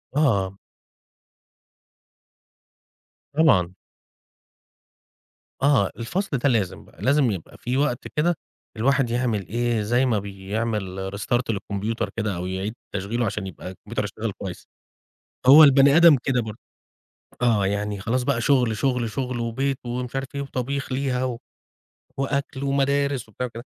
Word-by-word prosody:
آه. 100 -10 +2 2.8
طبعًا. 110 - +4 1.9
آه، 135 -8 +3
الفصل 155 - -2
ده 140 +3 +2
لازم 105 -8 -1
بقى، - - -18
لازم 135 -3 +3
يبقى 90 -5 -7
في 125 +2 -2
وقت 140 -4 0
كده 170 +3 +2 0.4
الواحد 130 +2 +2
يعمل 115 -6 -1
إيه، 120 0 0
زي 120 +5 +2
ما 115 -5 +2
بيعمل 95 -1 -3
restart 120 +4 0
للكمبيوتر 105 +1 -2
كده، 105 -4 -1
أو 90 +1 -4
يعيد 95 +4 -3 0.2
تشغيله 110 +5 -1
عشان 105 -2 -3
يبقى 90 0 -8
الكمبيوتر 95 - -5
يشتغل - - -4
كويس. - - -8 0.8
هو 150 +4 +10
البني 140 +1 +6
آدم 170 -3 +8
كده 125 -2 +1
برضه. 110 -1 -6 0.8
آه، 110 -5 +3
يعني 100 0 -2
خلاص 125 +4 0
بقى 125 -2 0
شغل، 125 -4 +2
شغل، 125 -1 0
شغل، 125 0 -3
وبيت، 130 +4 -1
ومش 125 +1 -4
عارف 135 0 -2
إيه، 140 - -2
وطبيخ 135 +1 -3
ليها، 130 -1 0
و 125 -2 -3 0.8
وأكل، 140 0 -2
ومدارس، 140 -2 0
وبتاع 125 +4 -4
وكده. 115 0 -9
120 Hz, 130 wpm, -24 LUFS, 105-135 Hz, 2.8 s, هو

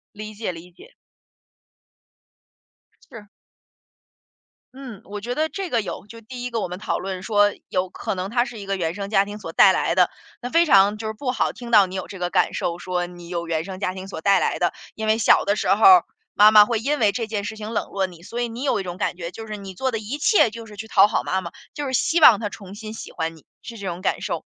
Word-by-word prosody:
理 215 +1 -8
解， 215 -2 -4
理 175 +1 -12
解。 465 - -18 2.2
是。 210 -3 -11 1.5
嗯， 255 -6 -10
我 205 +1 -7
觉 240 +4 -4
得 310 +3 0
这 385 -3 -5
个 230 -2 +2
有 200 - -7
就 230 +2 -12
第 245 +2 -9
一 250 - -4
个 230 - -1
我 - - -2
们 180 +1 -7
讨 210 - -2
论 190 -1 -5
说， 205 -1 +3 0.2
有 185 0 -1
可 185 - -4
能 185 +1 -4
它 240 +2 +1
是 240 -3 -9
一 200 - -9
个 195 -1 -1
原 165 -2 -2
生 200 +1 -6
家 200 -2 +3
庭 205 +1 -8
所 165 - -7
带 190 - +6
来 - - 0
的， - - +4 0.3
那 245 0 -5
非 335 +1 +5
常 200 -3 +5
就 220 0 -5
是 220 - -3
不 250 +3 -3
好 - - 0
听 240 -2 -10
到 205 -4 +6
你 185 - -8
有 190 - -4
这 195 - -9
个 175 0 -1
感 - - +1
受， 170 0 -2
说 180 0 -3
你 175 -1 -12
有 170 -1 -4
原 160 -1 -1
生 185 0 -8
家 185 -1 -2
庭 190 0 -8
所 175 -5 -7
带 200 +3 +4
来 - - -1
的， - - +1 0.2
因 220 0 -5
为 220 +1 +3
小 220 - +4
的 200 - +1
时 - - -2
候 210 - -1
儿， 370 -1 +8 0.3
妈 210 +1 +7
妈 210 -1 +8
会 230 0 -1
因 285 +6 -1
为 210 -3 +4
这 230 +2 -3
件 210 -2 -3
事 215 +2 -6
情 215 +1 -6
冷 - - -2
落 195 -1 -1
你， 175 -3 -11
所 230 +7 -5
以 240 - 0
你 230 +2 -8
有 275 -6 +1
一 - - -3
种 180 -1 -6
感 180 - -2
觉， 170 -1 -6
就 225 0 -9
是 215 -1 -5
你 195 -1 -9
做 260 +8 -1
的 230 - -2
一 220 +7 -5
切 295 - +4
就 230 0 -9
是 210 - -12
去 220 - -7
讨 200 -2 +5
好 215 - -1
妈 190 +1 -1
妈， 170 - -7 0.2
就 290 -2 -4
是 260 - -4
希 330 +6 +2
望 240 -9 +8
她 220 - -2
重 200 -2 -11
新 215 +1 -8
喜 225 - -9
欢 165 0 -4
你， 160 - -19 0.2
是 235 - -9
这 200 -3 -7
种 175 0 -5
感 - - -1
受。 - - -4
210 Hz, 290 characters per minute, -22 LUFS, 185-230 Hz, 2.2 s, 儿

